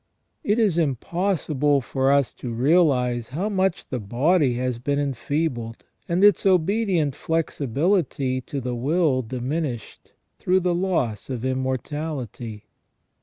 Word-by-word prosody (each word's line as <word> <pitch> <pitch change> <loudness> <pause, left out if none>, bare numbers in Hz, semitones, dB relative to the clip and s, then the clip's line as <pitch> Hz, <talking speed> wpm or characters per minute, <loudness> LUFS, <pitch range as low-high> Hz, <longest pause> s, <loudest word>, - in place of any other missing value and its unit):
It 215 -6 +1
is 205 -7 +2
impossible 150 -1 0
for 135 +1 0
us 140 -2 +2
to 125 - -6
realise 125 -3 +2
how 170 +11 -2
much 190 -3 0
the 130 - -2
body 130 - +2
has 125 -1 -2
been 140 +3 -1
enfeebled, 135 -3 -2 0.3
and 175 +3 +1
its 205 -1 +5
obedient 185 -4 +2
flexibility 145 - 0
to 140 +2 -5
the 125 -1 -3
will 140 +2 +1
diminished, 130 +1 -4 0.3
through 185 +1 +2
the 180 0 +1
loss 170 - -1
of 125 -2 -4
immortality. 130 -4 -3
140 Hz, 120 wpm, -24 LUFS, 125-170 Hz, 0.3 s, its